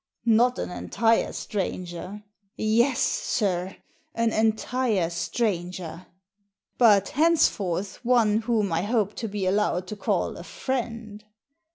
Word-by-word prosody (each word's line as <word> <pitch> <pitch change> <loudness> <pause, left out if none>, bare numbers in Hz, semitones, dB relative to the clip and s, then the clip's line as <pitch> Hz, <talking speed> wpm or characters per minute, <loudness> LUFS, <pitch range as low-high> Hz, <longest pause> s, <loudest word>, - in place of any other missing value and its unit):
" - - -43 0.2
Not 250 0 +2
an - - -4
entire 225 +5 +1
stranger! 185 -1 -5
" 200 - -47
" 195 - -51
Yes, 235 +5 +2
sir, 195 - 0 0.4
an 230 -1 +1
entire 220 -4 +1
stranger! 175 -2 -3 0.4
" 200 -1 -53
"But 210 -5 +5
henceforth 210 - +1
one 230 -3 +3
whom 215 -5 0
I 165 - +1
hope 210 0 0
to 225 - -3
be 200 -2 -3
allowed 185 -2 +1
to 215 - -4
call 205 - -1
a - - -8
friend." 230 -5 -4
210 Hz, 135 wpm, -25 LUFS, 185-230 Hz, 0.4 s, But